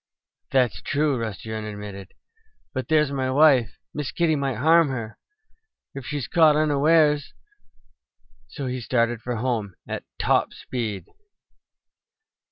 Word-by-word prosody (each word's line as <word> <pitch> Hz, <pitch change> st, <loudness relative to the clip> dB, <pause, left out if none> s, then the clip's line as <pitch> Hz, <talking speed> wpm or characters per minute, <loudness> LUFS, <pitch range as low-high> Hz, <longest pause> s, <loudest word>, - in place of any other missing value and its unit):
"That's 125 Hz, -9 st, +1 dB
true," 145 Hz, -1 st, 0 dB
Rusty 110 Hz, -1 st, -5 dB
Wren 110 Hz, 0 st, -4 dB
admitted. 105 Hz, -3 st, -8 dB, 0.6 s
"But 130 Hz, -2 st, -3 dB
there's 150 Hz, -3 st, +3 dB
my 130 Hz, -2 st, -1 dB
wife! 130 Hz, -5 st, +4 dB, 0.2 s
Miss 150 Hz, -2 st, -4 dB
Kitty 170 Hz, -2 st, +1 dB
might 140 Hz, -3 st, -1 dB
harm 160 Hz, +5 st, +5 dB
her, 115 Hz, -4 st, -5 dB, 0.7 s
if 135 Hz, -3 st, -8 dB
she 145 Hz, -, -2 dB
caught 160 Hz, -1 st, +4 dB
her 155 Hz, -, +3 dB
unawares." 150 Hz, 0 st, +3 dB, 1.1 s
So 140 Hz, -, -6 dB
he 130 Hz, 0 st, -3 dB
started 115 Hz, 0 st, 0 dB
for 120 Hz, +1 st, -3 dB
home 110 Hz, -5 st, -2 dB
at -, -, -4 dB, 0.2 s
top -, -, +2 dB
speed. 110 Hz, -6 st, -4 dB
130 Hz, 130 wpm, -24 LUFS, 110-150 Hz, 1.1 s, harm